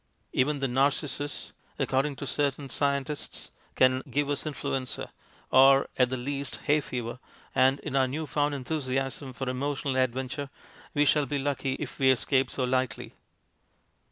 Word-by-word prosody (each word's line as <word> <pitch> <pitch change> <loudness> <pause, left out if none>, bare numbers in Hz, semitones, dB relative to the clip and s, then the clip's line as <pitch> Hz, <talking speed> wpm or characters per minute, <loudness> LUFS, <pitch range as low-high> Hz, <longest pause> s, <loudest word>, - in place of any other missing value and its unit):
Even 140 +2 +1
the 135 - +2
narcissus, 140 +2 0 0.2
according 135 +2 +1
to 140 - -6
certain 140 -1 -1
scientists, 140 +1 -1 0.2
can 130 0 +4
give 145 0 0
us 145 - -1
influenza, 135 -3 -3 0.4
or, 135 +1 +7
at 125 -1 +3
the 130 - -2
least, 140 +2 -3
hay 150 +1 +3
fever, 120 -3 -5 0.3
and 130 +1 +4
in - - -4
our 135 -1 +4
new 155 +5 -3
found 145 -1 0
enthusiasm 135 -1 -2
for 130 +1 -5
emo 135 +3 -1
tional 130 -1 +1
adventure 130 +3 -3 0.5
we 145 0 +4
shall 145 0 +3
be 145 - -1
lucky 135 -1 -1
if - - -6
we 135 -1 +5
escape 130 +1 +3
so 130 - -2
lightly. 130 -3 -1
135 Hz, 155 wpm, -28 LUFS, 130-145 Hz, 0.5 s, or